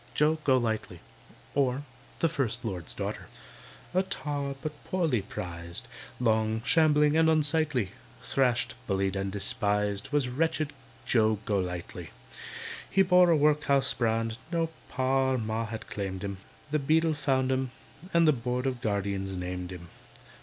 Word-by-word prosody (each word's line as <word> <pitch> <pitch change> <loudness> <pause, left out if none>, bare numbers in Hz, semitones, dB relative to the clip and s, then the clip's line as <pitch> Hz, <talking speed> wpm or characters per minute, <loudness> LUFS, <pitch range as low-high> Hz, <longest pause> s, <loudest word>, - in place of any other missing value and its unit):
JOE 155 +2 +3
GOLIGHTLY 115 - +1 0.5
OR, 135 0 +1 0.4
THE 165 - +5
FIRST 125 -7 -1
LORD'S 90 -7 -4
DAUGHTER - - -4 0.7
A 185 - +4
tar, 145 -7 -3
but 150 -2 -6
poorly 160 - +1
prized, 85 -3 -5 0.3
Long, 110 -1 +1
shambling, 150 -1 +4
and 160 0 +5
unsightly, 155 - +2 0.3
Thrashed, 125 -3 +1
bullied, 95 -1 0
and 95 0 -2
despised, 105 +3 0
Was 145 -3 +2
wretched 155 +3 0 0.3
JOE 110 -2 +3
GOLIGHTLY. 90 -4 -3 0.8
He 195 - +4
bore 180 -1 +6
a 165 - +5
workhouse 145 -2 +3
brand; 115 -1 0
No 165 -1 0 0.2
Pa 130 0 +2
or - - +1
Ma 110 0 -2
had 110 0 -6
claimed 95 -1 -4
him, 100 -1 -4 0.3
The 150 - +2
Beadle 160 +3 +3
found 135 -3 +1
him, 130 0 0 0.4
and 170 -1 +4
The 155 - +6
Board 125 0 -2
of 130 -2 -1
Guardians 100 -3 -1
named 90 0 -4
him. 85 -2 -9
125 Hz, 140 wpm, -29 LUFS, 105-150 Hz, 0.8 s, bore